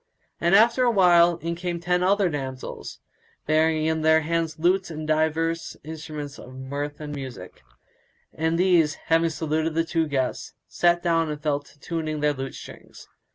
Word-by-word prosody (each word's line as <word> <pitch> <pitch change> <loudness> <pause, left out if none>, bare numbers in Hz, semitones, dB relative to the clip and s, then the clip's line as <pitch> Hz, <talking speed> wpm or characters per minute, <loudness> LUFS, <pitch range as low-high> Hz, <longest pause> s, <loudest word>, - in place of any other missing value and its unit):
And 170 +3 +3
after 235 +4 +5
a 245 - +4
while 175 -5 +5
in 170 0 -1
came 175 0 -4
other 180 +3 +2
ten - - -2
damsels, 130 -3 -6 0.5
bearing 155 0 +2
in 160 0 0
their 160 0 +4
hands 165 0 -1
lutes 185 +4 +1
and 155 -1 -6
divers 160 +1 0
instruments 150 -2 -7
of 130 - -11
mirth 140 +2 -5
and 150 -1 -6
music; 130 -10 -8 0.7
and 160 +1 0
these, 170 -4 +3
having 165 0 +1
saluted 160 0 -2
the 165 - +2
two 165 0 0
guests, 130 -3 -2
sat 175 0 +2
down 165 -2 +1
and 150 -1 -4
fell 145 -1 0
to 145 0 -21
tuning 155 0 -3
their 150 0 +2
lute 135 -1 -6
strings. - - -12
160 Hz, 165 wpm, -24 LUFS, 150-170 Hz, 0.7 s, after